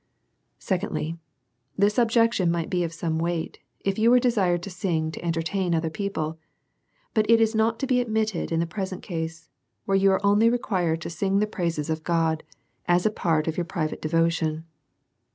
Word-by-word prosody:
Secondly/, 175 Hz, -4 st, -2 dB, 0.6 s
This 205 Hz, +3 st, +3 dB
objection 230 Hz, -5 st, +3 dB
might 170 Hz, +2 st, -1 dB
be 180 Hz, -1 st, +1 dB
of 165 Hz, -, -2 dB
some 165 Hz, -1 st, -2 dB
weight 170 Hz, -1 st, -2 dB, 0.2 s
if 195 Hz, +1 st, -1 dB
you 225 Hz, +2 st, +5 dB
was 250 Hz, 0 st, +6 dB
desired 190 Hz, -8 st, +2 dB
to 200 Hz, -, -6 dB
sing 165 Hz, -4 st, -1 dB
to -, -, -8 dB
entertain 170 Hz, +2 st, 0 dB
other 160 Hz, 0 st, -1 dB
people, 160 Hz, -5 st, -3 dB, 0.7 s
but 215 Hz, -1 st, +1 dB
is 225 Hz, -1 st, +5 dB
not 225 Hz, +1 st, +2 dB
to 270 Hz, -, -2 dB
be 250 Hz, -1 st, +2 dB
admitted 220 Hz, -6 st, -1 dB
in 165 Hz, -, +1 dB
the 170 Hz, -, +1 dB
present 190 Hz, +1 st, -5 dB
case, 165 Hz, -2 st, -5 dB, 0.4 s
where 195 Hz, -, -1 dB
you 195 Hz, 0 st, +4 dB
are 190 Hz, +1 st, +1 dB
only 205 Hz, +3 st, +5 dB
required 180 Hz, -9 st, 0 dB
to -, -, -5 dB
sing 195 Hz, +4 st, 0 dB
the 210 Hz, -, +3 dB
praises 170 Hz, -7 st, -2 dB
of 160 Hz, -1 st, -2 dB
God 165 Hz, -2 st, +1 dB, 0.5 s
as 175 Hz, +2 st, +3 dB
a 215 Hz, -, +3 dB
part 165 Hz, -6 st, 0 dB
of 160 Hz, -, -2 dB
your 175 Hz, -, 0 dB
own -, -, -20 dB
private 165 Hz, -5 st, -3 dB
devotion. 165 Hz, 0 st, 0 dB
175 Hz, 185 wpm, -25 LUFS, 165-210 Hz, 0.7 s, was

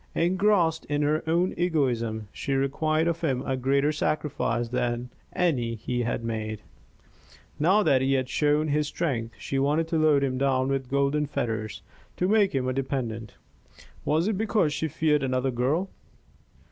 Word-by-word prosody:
Engrossed 175 Hz, -2 st, +2 dB
in 145 Hz, 0 st, -1 dB
her 150 Hz, +2 st, +1 dB
own 175 Hz, +3 st, +2 dB
egoism, 120 Hz, -, 0 dB
she 140 Hz, -, -3 dB
required 155 Hz, +4 st, +1 dB
of 170 Hz, -1 st, -1 dB
him 135 Hz, -6 st, 0 dB
a 135 Hz, -, 0 dB
greater 140 Hz, +3 st, +2 dB
sacrifice 145 Hz, -6 st, -1 dB
than 120 Hz, 0 st, -2 dB, 0.2 s
any 125 Hz, -10 st, 0 dB
he 120 Hz, +2 st, -3 dB
had 120 Hz, -1 st, -2 dB
made. 110 Hz, -2 st, -4 dB, 1.0 s
Now 190 Hz, +8 st, +4 dB
that 130 Hz, -7 st, +3 dB
he 135 Hz, +1 st, +2 dB
had 130 Hz, -1 st, +1 dB
shown 150 Hz, +2 st, +1 dB
his 150 Hz, +1 st, +1 dB
strength, 120 Hz, -8 st, -2 dB
she 135 Hz, -, -2 dB
wanted 150 Hz, +4 st, +1 dB
to 165 Hz, -, +1 dB
load 150 Hz, -3 st, +4 dB
him 130 Hz, -1 st, -1 dB
down 135 Hz, -1 st, +1 dB
with 135 Hz, -2 st, -2 dB
golden 140 Hz, +2 st, +1 dB
fetters 115 Hz, -6 st, -3 dB, 0.3 s
to 180 Hz, -, +1 dB
make 205 Hz, -5 st, +3 dB
him 130 Hz, -1 st, 0 dB
a 130 Hz, -, 0 dB
dependent. 125 Hz, -5 st, -3 dB, 0.7 s
Was 160 Hz, +5 st, +1 dB
it 210 Hz, -3 st, -1 dB
because 210 Hz, -8 st, +1 dB
she 160 Hz, -, -1 dB
feared 150 Hz, 0 st, +1 dB
another 130 Hz, 0 st, 0 dB
girl? 135 Hz, +10 st, 0 dB
140 Hz, 160 wpm, -26 LUFS, 125-160 Hz, 1.0 s, Now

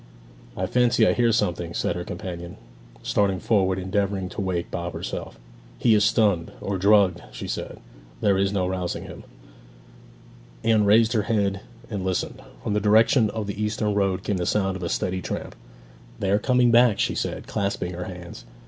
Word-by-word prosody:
'I 95 Hz, -, 0 dB
fancy 120 Hz, +3 st, +3 dB
I -, -, +4 dB
hear 120 Hz, -1 st, +3 dB
something!' 85 Hz, -5 st, -1 dB
said -, -, -1 dB
her -, -, -4 dB
companion, 85 Hz, -1 st, -7 dB, 0.5 s
starting 100 Hz, -2 st, +1 dB
forward 95 Hz, -4 st, +2 dB
and 95 Hz, -, -4 dB
endeavouring 95 Hz, -1 st, -1 dB
to -, -, -5 dB
wake 90 Hz, -3 st, -2 dB
Bob 85 Hz, 0 st, -4 dB
herself. -, -, -6 dB, 0.4 s
'He 115 Hz, -, +3 dB
is 105 Hz, -1 st, +4 dB
stunned, 105 Hz, -6 st, +2 dB
or 100 Hz, -1 st, -3 dB
drugged!' 100 Hz, -3 st, +4 dB
she -, -, -7 dB
said; -, -, -5 dB, 0.4 s
'there 100 Hz, +7 st, +3 dB
is 100 Hz, 0 st, +1 dB
no 95 Hz, -2 st, 0 dB
rousing 90 Hz, -1 st, -3 dB
him.' -, -, -10 dB, 1.4 s
Anne 110 Hz, -2 st, +3 dB
raised 110 Hz, +3 st, +5 dB
her 110 Hz, -, +2 dB
head 100 Hz, -3 st, +1 dB, 0.3 s
and 100 Hz, -5 st, -4 dB
listened. 95 Hz, -1 st, -2 dB, 0.2 s
From -, -, -1 dB
the 105 Hz, -, +2 dB
direction 110 Hz, +2 st, +4 dB
of 110 Hz, -1 st, -4 dB
the 100 Hz, +1 st, -5 dB
eastern 105 Hz, 0 st, -1 dB
road 95 Hz, -2 st, 0 dB
came 100 Hz, -, -1 dB
the 90 Hz, -, -2 dB
sound 95 Hz, -2 st, +1 dB
of 95 Hz, -, -7 dB
a 85 Hz, -, -3 dB
steady 95 Hz, 0 st, -1 dB
tramp. -, -, -5 dB, 0.6 s
'They 95 Hz, -1 st, -1 dB
are 100 Hz, -, +3 dB
coming 125 Hz, 0 st, +3 dB
back!' 120 Hz, -3 st, +5 dB
she -, -, +1 dB
said, -, -, -3 dB
clasping 100 Hz, -3 st, -2 dB
her 90 Hz, +1 st, -5 dB
hands. 90 Hz, -8 st, -9 dB
100 Hz, 185 wpm, -24 LUFS, 90-110 Hz, 1.4 s, raised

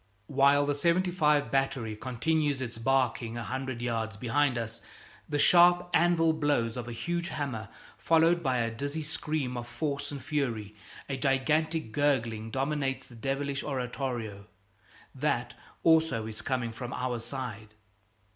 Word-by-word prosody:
While 140 Hz, +2 st, +4 dB
the 145 Hz, -, +1 dB
"75" 155 Hz, -4 st, +2 dB
battery 135 Hz, -5 st, 0 dB
continues 140 Hz, +5 st, 0 dB
its 120 Hz, -3 st, -5 dB
barking 120 Hz, -2 st, +1 dB
a 120 Hz, -, -3 dB
hundred 130 Hz, 0 st, -4 dB
yards 115 Hz, -3 st, -2 dB
behind 125 Hz, +3 st, +1 dB
us 115 Hz, -1 st, -5 dB, 0.5 s
the 145 Hz, -, 0 dB
sharp 175 Hz, +3 st, +5 dB
anvil 165 Hz, -1 st, +4 dB
blows 145 Hz, -7 st, +1 dB
of 120 Hz, -2 st, -5 dB
a -, -, -5 dB
huge 170 Hz, +8 st, -2 dB
hammer, 125 Hz, -9 st, -4 dB, 0.3 s
followed 165 Hz, +1 st, +4 dB
by 130 Hz, -5 st, +1 dB
a 115 Hz, -1 st, 0 dB
dizzy 140 Hz, +7 st, -4 dB
scream 150 Hz, -3 st, -2 dB
of 120 Hz, 0 st, -5 dB
force 140 Hz, +5 st, -3 dB
and 140 Hz, -, -5 dB
fury 120 Hz, -9 st, -2 dB, 0.3 s
a 135 Hz, -, -3 dB
gigantic 150 Hz, +1 st, +1 dB
gurgling 115 Hz, -5 st, 0 dB
dominates 135 Hz, 0 st, -1 dB
the 120 Hz, -, -14 dB
devilish 135 Hz, +3 st, -2 dB
oratorio; 125 Hz, -6 st, -3 dB, 0.7 s
that, -, -, -1 dB, 0.3 s
also, 160 Hz, -9 st, +4 dB
is 110 Hz, -1 st, -5 dB
coming 125 Hz, -3 st, -1 dB
from 120 Hz, +2 st, -6 dB
our 125 Hz, -1 st, -2 dB
side. 110 Hz, -4 st, -6 dB
135 Hz, 140 wpm, -29 LUFS, 115-150 Hz, 0.7 s, sharp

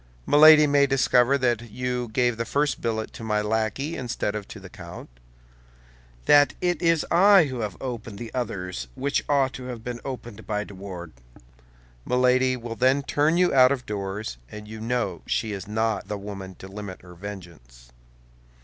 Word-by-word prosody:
Milady 155 Hz, +1 st, +8 dB
may 140 Hz, -1 st, +4 dB
discover 135 Hz, -1 st, +3 dB
that 120 Hz, -3 st, 0 dB
you 125 Hz, +1 st, -3 dB
gave 120 Hz, 0 st, +1 dB
the 115 Hz, -, -2 dB
first 145 Hz, +5 st, -1 dB
billet 110 Hz, -1 st, -2 dB
to -, -, -9 dB
my 105 Hz, -1 st, 0 dB
lackey 110 Hz, +8 st, -1 dB
instead 120 Hz, -4 st, -3 dB
of 105 Hz, -2 st, -5 dB
to 110 Hz, -, -10 dB
the 95 Hz, -, -11 dB
count's; 85 Hz, -, -11 dB, 1.1 s
that 145 Hz, 0 st, +5 dB
it 175 Hz, -1 st, 0 dB
is 165 Hz, -2 st, +2 dB
I 195 Hz, +2 st, +7 dB
who 130 Hz, -4 st, -4 dB
have 105 Hz, -5 st, -4 dB
opened 115 Hz, -5 st, -6 dB
the 115 Hz, +1 st, -8 dB
others 90 Hz, -, -4 dB
which 140 Hz, +1 st, -1 dB
ought 135 Hz, -2 st, +2 dB
to 130 Hz, -, -8 dB
have 120 Hz, -3 st, -7 dB
been 120 Hz, 0 st, -5 dB
opened 120 Hz, -5 st, -8 dB
by 105 Hz, -1 st, -1 dB
de 105 Hz, -, -12 dB
Wardes. 90 Hz, -9 st, -9 dB, 0.8 s
Milady 125 Hz, -, +2 dB
will 115 Hz, -1 st, -6 dB
then 130 Hz, +4 st, +2 dB
turn 150 Hz, +4 st, +1 dB
you 180 Hz, 0 st, +3 dB
out 130 Hz, -1 st, +6 dB
of 130 Hz, -3 st, -2 dB
doors, 100 Hz, -, -5 dB
and 105 Hz, 0 st, -9 dB
you 110 Hz, 0 st, -8 dB
know 120 Hz, +2 st, -2 dB
she 110 Hz, -, -1 dB
is 100 Hz, -2 st, -6 dB
not 110 Hz, -1 st, -1 dB
the 105 Hz, -, -3 dB
woman 100 Hz, -2 st, -8 dB
to 95 Hz, -, -11 dB
limit 100 Hz, -2 st, -8 dB
her 90 Hz, -1 st, -13 dB
vengeance." 85 Hz, -11 st, -11 dB
115 Hz, 175 wpm, -25 LUFS, 100-130 Hz, 1.1 s, Milady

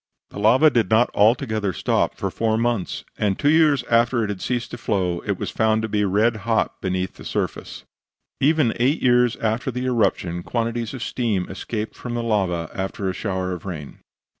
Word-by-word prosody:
The -, -, -7 dB
lava 130 Hz, +9 st, +5 dB
did 115 Hz, -4 st, +1 dB
not 110 Hz, +2 st, +3 dB
altogether 110 Hz, -2 st, +2 dB
stop -, -, 0 dB
for -, -, -3 dB
four 110 Hz, -1 st, 0 dB
months, 115 Hz, -4 st, -1 dB
and 100 Hz, -2 st, +1 dB
two 145 Hz, -, +3 dB
years 155 Hz, -5 st, +4 dB
after 120 Hz, 0 st, +2 dB
it 105 Hz, -, -2 dB
had 95 Hz, -, -6 dB
ceased 120 Hz, -1 st, -2 dB
to 120 Hz, -, -7 dB
flow 90 Hz, -6 st, -1 dB
it -, -, 0 dB
was -, -, -4 dB
found 110 Hz, 0 st, +1 dB
to -, -, -1 dB
be 105 Hz, -1 st, 0 dB
red 110 Hz, +4 st, +2 dB
hot 110 Hz, +2 st, -1 dB
beneath 95 Hz, 0 st, -2 dB
the -, -, -11 dB
surface. -, -, -4 dB, 0.6 s
Even 150 Hz, -4 st, +3 dB
eight 130 Hz, +6 st, +1 dB
years 125 Hz, -1 st, +4 dB
after 115 Hz, +4 st, -1 dB
the 125 Hz, 0 st, -3 dB
eruption 100 Hz, -8 st, 0 dB
quantities 115 Hz, +3 st, -2 dB
of 125 Hz, -, -5 dB
steam 110 Hz, -9 st, -1 dB
escaped 105 Hz, +2 st, -4 dB
from 120 Hz, -1 st, -6 dB
the 120 Hz, -, -2 dB
lava 95 Hz, -7 st, 0 dB
after 95 Hz, 0 st, -3 dB
a -, -, -7 dB
shower 95 Hz, -2 st, -3 dB
of 90 Hz, -2 st, -5 dB
rain. 80 Hz, -7 st, -7 dB
110 Hz, 190 wpm, -22 LUFS, 95-120 Hz, 0.6 s, lava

